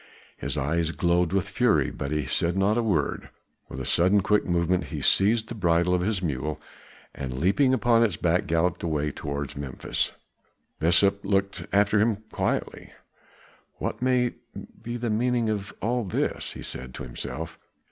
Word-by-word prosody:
His - - -4
eyes 80 +4 0
glowed 85 0 +1
with 95 0 0
fury, 100 - +2
but 70 - -5
he 75 -2 0
said 85 +7 0
not 100 +2 +3
a 120 - +2
word; 95 -10 -1 0.4
with 65 - -7
a 65 - -4
sudden 95 +4 +4
quick 105 +1 +2
movement, 90 0 +1
he 70 - -5
seized 110 +3 +3
the - - -6
bridle 85 -3 +2
of 90 - +2
his 95 0 -1
mule, 75 -1 -2 0.5
and 65 -2 -5
leaping 100 - +3
upon 120 -2 +3
its 105 -8 +2
back 85 +1 +1
galloped 85 +2 +1
away 75 -3 -1
towards 70 -1 -5
Memphis. 70 -2 -2 0.7
Besa 90 +5 +4
looked 100 -1 -1
after 105 +1 +3
him 110 -1 +1
quietly. - - -2 0.8
"What - - -4
may 125 -1 +2 0.5
be 120 +1 -4
the 120 -1 -2
meaning 120 +1 +1
of 100 -1 -3
all 120 +2 +1
this?" 95 - -2
he - - -8
said 65 0 -5
to - - -6
himself. 60 - -6
90 Hz, 165 wpm, -26 LUFS, 80-110 Hz, 0.8 s, sudden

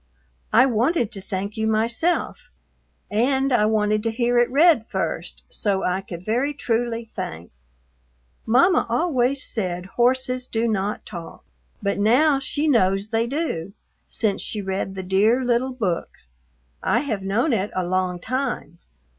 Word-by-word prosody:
I 230 +4 +6
wanted 245 +1 +1
to 195 - -7
thank 195 +1 -4
you 220 0 0
myself, 230 +10 0 0.6
and 265 +5 +2
I 215 -3 +4
wanted 215 -1 +1
to 225 - -1
hear 240 +1 +1
it 240 - +3
read 285 -4 +4
first - - -4
so 205 - -1
I 180 +1 0
could 180 -2 -9
very 255 +7 0
trully 230 -3 -2
thank. 85 +2 -6 1.0
Mama 270 +10 +4
always 260 -1 +1
said 180 -5 -3 0.2
horses 255 0 +1
do 230 +1 0
not 210 -1 -2
talk, 170 -2 -9 0.4
but 200 0 0
now 270 +7 +4
she 290 +3 -1
knows 195 -6 +2
they 225 +1 0
do 235 - -3 0.3
since 215 -3 -1
she 215 - -3
read 190 0 -3
the 190 - -5
Dear 210 +7 +2
little 245 +2 +1
book. 195 -9 -2 0.7
I 235 - +2
have 225 -9 -3
known 225 +9 +1
it 205 -1 0
along 185 -1 -1
time. 245 - -3
225 Hz, 145 wpm, -23 LUFS, 195-255 Hz, 1.0 s, I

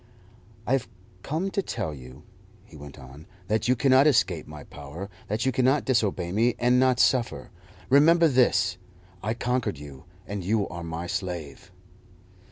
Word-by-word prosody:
"I - - -3
have 135 -2 +1 0.3
come 165 - -3
to 200 - 0
tell 80 - -4
you," 65 +1 -12 0.4
he - - -17
went 70 -1 -11
on, 65 +3 -13 0.2
"that 110 +1 0
you 125 - +3
cannot 135 +3 +4
escape 95 - +1
my 75 -1 -10
power, 80 +8 -9 0.2
that 110 +4 -2
you 130 - +2
cannot 130 +3 +2
disobey 100 -9 0
me 115 +5 +2
and 125 +1 +3
not 130 -1 +3
suffer. 125 -3 +1 0.4
Remember 165 +5 +5
this: 125 - +2 0.4
I 110 +3 -2
conquered 125 - -1
you, 70 +1 -11 0.2
and 100 -1 -5
you 105 +2 0
are 85 0 -7
my 85 +1 -5
slave." 90 -2 -5
105 Hz, 160 wpm, -26 LUFS, 80-130 Hz, 0.4 s, Remember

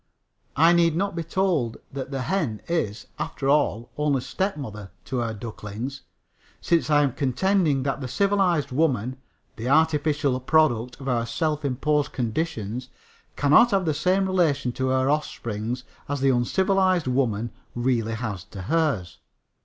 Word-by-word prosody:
I 165 +3 +6
need 170 -2 +3
not 195 +1 -1
be 170 - -2
told 165 -9 0 0.2
that 135 -1 -5
the 135 -2 -3
hen 155 - -1
is, 120 -11 -2
after 155 -3 -3
all, 140 -5 +1
only 145 -3 +1
stepmother 130 - -4 0.2
to 130 - -3
her 115 -2 -1
ducklings, 110 +4 -6 0.6
since 170 -2 +1
I 145 -1 +5
am 140 - +1
contending 150 +1 +1
that 135 0 -2
the 130 - -3
civilized 185 -3 +1
woman 130 -4 0 0.4
the 115 +3 -3
artificial 150 -3 +2
product 125 -4 +2
of 135 - -8
our 120 -2 0
self 150 +5 -1
imposed 145 +2 0
conditions 125 -2 -3 0.5
cannot 150 +12 +5
have 195 -4 +1
the 155 - +1
same 185 +6 +2
relation 160 -9 +1
to 130 +2 -2
her 130 0 +2
offspring 120 -6 -2 0.3
as 145 0 -1
the 135 0 +3
uncivilized 185 +7 +2
woman 120 -4 0 0.2
really 120 -2 0
has 110 -6 -4
to 95 -3 -9
hers. 135 - 0
140 Hz, 145 wpm, -25 LUFS, 120-160 Hz, 0.6 s, I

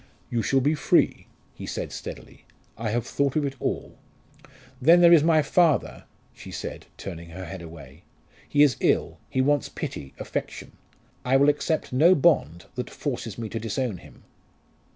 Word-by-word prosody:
"You 120 - 0
shall 135 +3 +2
be 145 +4 +2
free," 150 - +2 0.3
he - - -9
said - - -4
steadily. - - -9 0.3
"I 115 0 -3
have 115 +2 -1
thought 140 -1 -1
of 150 -2 +1
it 140 - -2
all." - - -4 0.8
"Then 165 +7 +7
there 170 -1 +7
is 165 - +7
my 160 -1 +4
father," 160 0 +1 0.3
she - - -12
said, - - -7
turning 85 -3 -8
her 95 +3 -8
head 85 - -8
away. 80 -3 -12 0.5
"He 145 0 +5
is 140 -6 +3
ill - - +1
he 130 - +1
wants 145 0 +1
pity, 70 - -7
affection. - - -5 0.5
I 130 +2 +3
will 140 +2 +5
accept 150 0 -1
no 165 +8 +6
bond 100 - +2
that 125 - -5
forces 120 -7 -5
me 115 -1 -4
to 115 - -4
disown 115 -1 -2
him." - - -17
130 Hz, 170 wpm, -25 LUFS, 105-150 Hz, 0.8 s, Then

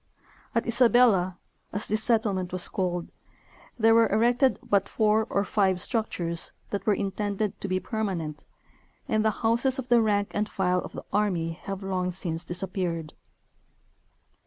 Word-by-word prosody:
At 230 - +1
Isabella, 235 -6 +4 0.3
as 205 +2 -3
this 215 +1 0
settlement 210 -6 +1
was 185 -1 -1
called, 175 -2 -2 0.7
there 225 -1 +5
were 230 0 +5
erected 245 +4 +3
but 200 -2 +2
four 215 0 +2
or 200 +1 +1
five 190 -4 +2
structures 175 -6 -2 0.2
that 200 0 -3
were 210 - +4
intended 200 +1 -2
to - - -2
be 185 -1 0
permanent, 185 -9 -3 0.6
and 215 -5 +1
the 220 - +4 0.2
houses 235 +4 +2
of 255 -2 -5
the 240 -1 +6
rank 205 -2 +1
and 210 0 -1
file 180 -2 +1
of - - -7
the - - -8
army 180 -6 +1
have 195 +4 -6
long 185 -1 -1
since 170 -2 -4
disappeared. 175 -2 -3
200 Hz, 150 wpm, -27 LUFS, 180-220 Hz, 0.7 s, the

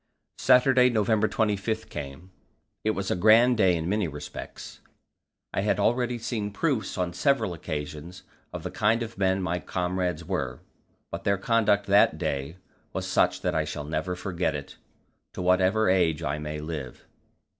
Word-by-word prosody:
Saturday, 125 0 +5
November 110 -1 +2
25, 110 +1 -1
came; 75 +6 -8 0.5
it 110 - +1
was 100 -3 -2
a - - +2
grand 110 +6 +5
day 95 -5 +4
in 80 0 -3
many 100 0 0
respects. 75 -1 -8 0.7
I - - 0
had 105 - +1
already 120 0 +1
seen 110 -3 -3
proofs 125 +1 -1
on 90 -1 -1
several 110 -2 +1
occasions 75 +2 -6 0.3
of - - -7
the - - -4
kind 110 +2 +2
of 115 -3 -9
men 95 0 +1
my 90 0 -1
comrades 90 -2 -2
were, 70 -9 -3 0.5
but - - -5
their 100 -1 +2
conduct 105 -1 +2
that 100 +1 +4
day 70 +5 -3 0.4
was - - -3
such - - +1
that - - 0
I 80 - +1
shall 75 -1 -5
never 80 +4 -3
forget 90 -4 -2
it, 70 -1 -7 0.6
to - - -4
whatever 95 +4 +3
age 85 -4 +2
I 75 0 -2
may 75 0 -5
live. 75 -5 -6
95 Hz, 160 wpm, -26 LUFS, 80-110 Hz, 0.7 s, Saturday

